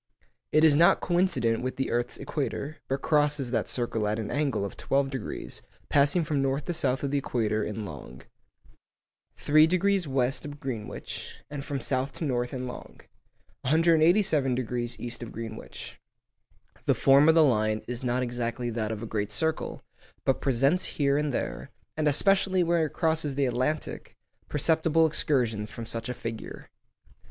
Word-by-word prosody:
It 155 Hz, +1 st, +4 dB
is 155 Hz, -3 st, +7 dB
not 170 Hz, +3 st, +5 dB
coincident 175 Hz, -11 st, +1 dB
with 130 Hz, +1 st, -3 dB
the 135 Hz, -, -2 dB
earth's 120 Hz, 0 st, -1 dB
equator, 150 Hz, +3 st, -4 dB
but 135 Hz, +1 st, -2 dB
crosses 145 Hz, -4 st, +2 dB
that 115 Hz, -4 st, 0 dB
circle 115 Hz, -3 st, -1 dB
at 105 Hz, +1 st, 0 dB
an 110 Hz, -2 st, -4 dB
angle 140 Hz, -9 st, 0 dB
of 100 Hz, -, -7 dB
twelve 135 Hz, 0 st, 0 dB
degrees, 130 Hz, -5 st, -5 dB, 0.3 s
passing 145 Hz, +5 st, +3 dB
from 150 Hz, -2 st, 0 dB
north 135 Hz, +1 st, -1 dB
to 175 Hz, -, -2 dB
south 135 Hz, -4 st, 0 dB
of 140 Hz, -, -1 dB
the 145 Hz, -, +2 dB
equator 110 Hz, -5 st, -1 dB
in 105 Hz, 0 st, -4 dB
long. 65 Hz, -6 st, -10 dB, 1.1 s
3° 175 Hz, +5 st, +3 dB
west 130 Hz, -1 st, 0 dB
of 145 Hz, 0 st, -8 dB
Greenwich, 120 Hz, -7 st, -6 dB
and 145 Hz, -2 st, -5 dB
from 140 Hz, -1 st, -3 dB
south 130 Hz, +2 st, -1 dB
to 165 Hz, -, -4 dB
north 120 Hz, -3 st, -1 dB
in 130 Hz, -1 st, -4 dB
long. 125 Hz, -, -9 dB, 0.6 s
187° 150 Hz, -, +2 dB
east 120 Hz, 0 st, -4 dB
of 120 Hz, -, -7 dB
Greenwich. 110 Hz, -1 st, -8 dB, 0.9 s
The -, -, +4 dB
form 140 Hz, +3 st, +5 dB
of 160 Hz, -, +6 dB
the 165 Hz, -, +7 dB
line 110 Hz, -5 st, +2 dB
is 125 Hz, +1 st, -5 dB
not 125 Hz, +1 st, 0 dB
exactly 120 Hz, 0 st, -3 dB
that 110 Hz, -1 st, -2 dB
of 110 Hz, 0 st, -5 dB
a -, -, -3 dB
great 105 Hz, -2 st, -2 dB
circle, 160 Hz, +7 st, -1 dB, 0.4 s
but 135 Hz, -, +1 dB
presents 135 Hz, +7 st, +2 dB
here 140 Hz, -2 st, +2 dB
and 150 Hz, 0 st, 0 dB
there -, -, -3 dB, 0.3 s
(and 155 Hz, -1 st, 0 dB
especially 190 Hz, +4 st, +3 dB
where 170 Hz, -2 st, +2 dB
it -, -, -14 dB
crosses 160 Hz, -4 st, 0 dB
the 140 Hz, 0 st, +2 dB
Atlantic) 130 Hz, +5 st, -2 dB, 0.3 s
perceptible 160 Hz, +2 st, +3 dB
excursions 120 Hz, -9 st, 0 dB
from 115 Hz, +1 st, -7 dB
such 115 Hz, +1 st, -5 dB
a 125 Hz, -, -3 dB
figure. 115 Hz, -1 st, -7 dB
135 Hz, 165 wpm, -27 LUFS, 120-155 Hz, 1.1 s, is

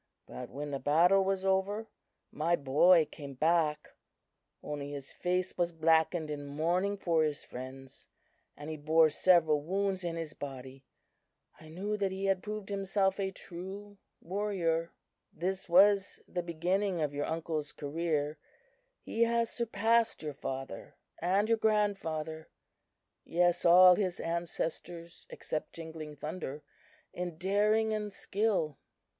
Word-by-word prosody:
But 125 Hz, -, -8 dB
when 145 Hz, +2 st, -6 dB
the 140 Hz, -, -2 dB
battle 175 Hz, +8 st, +4 dB
was 190 Hz, 0 st, -1 dB
over, 195 Hz, +3 st, +1 dB, 0.5 s
my 165 Hz, +3 st, +1 dB
boy 155 Hz, +4 st, +5 dB
came 140 Hz, -3 st, -9 dB
back; 155 Hz, 0 st, +1 dB, 0.7 s
only 145 Hz, -1 st, -5 dB
his 140 Hz, -2 st, -6 dB
face 180 Hz, +1 st, -1 dB
was 175 Hz, 0 st, +1 dB
blackened 160 Hz, 0 st, +2 dB
in 145 Hz, -1 st, -5 dB
mourning 175 Hz, +7 st, 0 dB
for 170 Hz, -4 st, +1 dB
his 150 Hz, -2 st, -2 dB
friends, 130 Hz, +1 st, -10 dB, 0.5 s
and 150 Hz, +2 st, -7 dB
he 155 Hz, -, -5 dB
bore 155 Hz, +1 st, +4 dB
several 160 Hz, -3 st, +4 dB
wounds 190 Hz, +3 st, -1 dB
in 170 Hz, -1 st, -2 dB
his 165 Hz, -2 st, -5 dB
body. 135 Hz, -2 st, -8 dB, 0.7 s
I 155 Hz, -, -13 dB
knew 200 Hz, +6 st, -3 dB
that 195 Hz, -2 st, 0 dB
he 190 Hz, +1 st, -3 dB
had 195 Hz, -1 st, +2 dB
proved 210 Hz, 0 st, -6 dB
himself 195 Hz, 0 st, 0 dB
a 195 Hz, -1 st, 0 dB
true 195 Hz, +3 st, -9 dB, 0.2 s
warrior. 175 Hz, -4 st, -1 dB, 0.4 s
"This 185 Hz, +2 st, -3 dB
was 200 Hz, +3 st, +5 dB
the 180 Hz, -, -3 dB
beginning 175 Hz, +3 st, -1 dB
of 150 Hz, -2 st, -1 dB
your 145 Hz, 0 st, -2 dB
uncle's 160 Hz, -2 st, -3 dB
career, 150 Hz, 0 st, -2 dB, 0.6 s
He 230 Hz, +1 st, +1 dB
has 235 Hz, 0 st, +1 dB
surpassed 230 Hz, -2 st, +1 dB
your 150 Hz, -1 st, -4 dB
father 135 Hz, -5 st, -6 dB, 0.2 s
and 190 Hz, +5 st, +2 dB
your 230 Hz, 0 st, +2 dB
grandfather; 165 Hz, -8 st, -1 dB, 0.7 s
yes, 175 Hz, +1 st, +1 dB
all 180 Hz, +1 st, +9 dB
his 185 Hz, -3 st, -1 dB
ancestors 170 Hz, 0 st, -4 dB
except 155 Hz, -, -5 dB
Jingling 160 Hz, -2 st, -8 dB
Thunder, 150 Hz, -1 st, -6 dB, 0.5 s
in 175 Hz, -2 st, -5 dB
daring 210 Hz, +4 st, +2 dB
and 210 Hz, -1 st, -3 dB
skill." 195 Hz, -8 st, -1 dB
170 Hz, 135 wpm, -31 LUFS, 155-195 Hz, 0.7 s, all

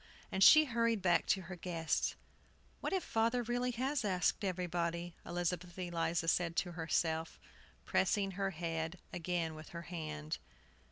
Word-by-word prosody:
And 190 Hz, -, +3 dB
she 310 Hz, +8 st, +9 dB
hurried 230 Hz, -5 st, +1 dB
back 175 Hz, -2 st, +3 dB
to 190 Hz, +1 st, +2 dB
her 185 Hz, +2 st, -7 dB
guests. 165 Hz, -2 st, -1 dB, 0.6 s
"What -, -, -2 dB
if 380 Hz, -3 st, 0 dB
father 230 Hz, +2 st, +1 dB
really 245 Hz, +2 st, 0 dB
has 265 Hz, +1 st, 0 dB
asked 185 Hz, 0 st, +1 dB
everybody?" 175 Hz, -2 st, -1 dB
Elizabeth 175 Hz, 0 st, -2 dB
Eliza 170 Hz, -2 st, -1 dB
said 170 Hz, 0 st, +2 dB
to 175 Hz, -, 0 dB
herself, 160 Hz, -1 st, -1 dB, 0.5 s
pressing 195 Hz, +1 st, +2 dB
her 195 Hz, +1 st, -1 dB
head 165 Hz, -1 st, -3 dB, 0.2 s
again 170 Hz, -1 st, -1 dB
with 155 Hz, 0 st, -10 dB
her 170 Hz, 0 st, -7 dB
hand. 155 Hz, -, -5 dB
175 Hz, 145 wpm, -35 LUFS, 165-195 Hz, 0.6 s, she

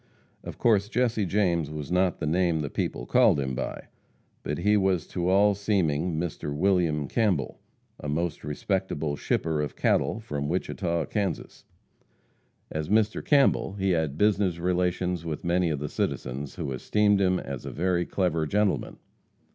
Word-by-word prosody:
Of -, -, -8 dB
course 105 Hz, -3 st, +3 dB
Jesse 120 Hz, -5 st, +1 dB
James 85 Hz, -6 st, +1 dB
was 75 Hz, -1 st, -6 dB
not 90 Hz, -1 st, +2 dB
the 80 Hz, -, -2 dB
name 85 Hz, 0 st, +1 dB
the 70 Hz, -, -4 dB
people -, -, -3 dB
called -, -, +4 dB
him 65 Hz, -1 st, -2 dB
by, 60 Hz, -, -4 dB, 0.6 s
but 75 Hz, -, -3 dB
he 105 Hz, +4 st, +3 dB
was 95 Hz, -4 st, +2 dB
to 90 Hz, -1 st, -1 dB
all 100 Hz, +2 st, +5 dB
seeming 90 Hz, -5 st, 0 dB
Mr. 80 Hz, -3 st, -4 dB
William 85 Hz, -4 st, +1 dB
Campbell, 95 Hz, -, 0 dB, 0.4 s
a 75 Hz, -, -5 dB
most 85 Hz, +3 st, -2 dB
respectable 75 Hz, -1 st, -2 dB
shipper 80 Hz, +1 st, -1 dB
of 75 Hz, -, -4 dB
cattle 110 Hz, -, +1 dB
from 75 Hz, -10 st, -4 dB
Wichita, 85 Hz, -2 st, -1 dB
Kansas. 100 Hz, -5 st, -3 dB, 1.1 s
As 80 Hz, +1 st, -3 dB
Mr. 105 Hz, 0 st, +2 dB
Campbell, 140 Hz, -8 st, +3 dB
he 95 Hz, -1 st, 0 dB
had 80 Hz, -4 st, 0 dB
business 100 Hz, -3 st, +2 dB
relations 90 Hz, 0 st, 0 dB
with 80 Hz, -1 st, -5 dB
many 85 Hz, 0 st, +2 dB
of 75 Hz, -, -1 dB
the 75 Hz, +2 st, -4 dB
citizens, 70 Hz, 0 st, -3 dB
who 80 Hz, -6 st, -4 dB
esteemed 105 Hz, -, +2 dB
him 95 Hz, -1 st, +2 dB
as 70 Hz, -2 st, -6 dB
"a -, -, -5 dB
very 90 Hz, +1 st, 0 dB
clever 85 Hz, -5 st, 0 dB
gentleman." 105 Hz, +2 st, 0 dB
90 Hz, 155 wpm, -27 LUFS, 75-100 Hz, 1.1 s, all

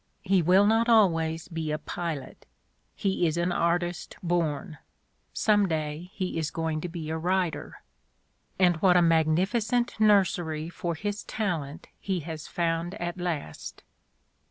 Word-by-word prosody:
He 195 Hz, -2 st, +3 dB
will 185 Hz, +5 st, +5 dB
not 225 Hz, +2 st, +3 dB
always 165 Hz, -7 st, +3 dB
be 165 Hz, -3 st, -4 dB
a 150 Hz, -, 0 dB
pilot; 160 Hz, -3 st, -6 dB, 0.5 s
he 190 Hz, -3 st, +1 dB
is 160 Hz, +1 st, -1 dB
an 175 Hz, +1 st, +1 dB
artist 175 Hz, 0 st, -1 dB
born; 165 Hz, -2 st, -1 dB, 0.5 s
some 205 Hz, -2 st, +3 dB
day 155 Hz, +1 st, -3 dB
he 185 Hz, -4 st, -2 dB
is 155 Hz, -2 st, -1 dB
going 160 Hz, -1 st, -2 dB
to 180 Hz, -, -4 dB
be 165 Hz, -2 st, -5 dB
a 160 Hz, -, -2 dB
writer. 180 Hz, -2 st, -2 dB, 0.7 s
And 180 Hz, -3 st, +4 dB
what 180 Hz, +2 st, +4 dB
a -, -, +6 dB
magnificent 190 Hz, +10 st, +1 dB
nursery 175 Hz, -7 st, +2 dB
for 170 Hz, -1 st, -3 dB
his 205 Hz, +4 st, -3 dB
talent 170 Hz, -6 st, -3 dB
he 190 Hz, -3 st, -2 dB
has 160 Hz, 0 st, -7 dB
found 170 Hz, +1 st, -1 dB
at 175 Hz, +1 st, -4 dB
last! 160 Hz, -, -5 dB
175 Hz, 140 wpm, -27 LUFS, 160-190 Hz, 0.7 s, a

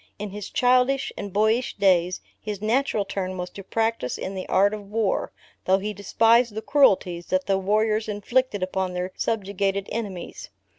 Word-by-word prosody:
In 205 Hz, -1 st, -5 dB
his 205 Hz, 0 st, -7 dB
childish 255 Hz, +2 st, +2 dB
and 200 Hz, -1 st, -6 dB
boyish 220 Hz, +5 st, +1 dB
days, 185 Hz, -2 st, +2 dB, 0.2 s
his 210 Hz, -2 st, -5 dB
natural 220 Hz, -1 st, +1 dB
turn 185 Hz, -1 st, -4 dB
was 180 Hz, 0 st, -5 dB
to 195 Hz, -, -9 dB
practise 225 Hz, -, -1 dB
in 190 Hz, -, -5 dB
the 185 Hz, -1 st, -6 dB
art 200 Hz, +2 st, +4 dB
of 205 Hz, -2 st, -7 dB
war, 215 Hz, -2 st, 0 dB, 0.3 s
though 190 Hz, +1 st, +4 dB
he 210 Hz, +2 st, -4 dB
despised 225 Hz, +3 st, +3 dB
the 220 Hz, -, -4 dB
cruelties 185 Hz, -11 st, +3 dB
that 185 Hz, 0 st, 0 dB
the 195 Hz, -1 st, +1 dB
warriors 215 Hz, +2 st, +1 dB
inflicted 210 Hz, 0 st, 0 dB
upon 185 Hz, 0 st, -2 dB
their 180 Hz, +1 st, -3 dB
subjugated 200 Hz, -2 st, -1 dB
enemies. 200 Hz, -6 st, -5 dB
205 Hz, 165 wpm, -24 LUFS, 190-225 Hz, 0.3 s, art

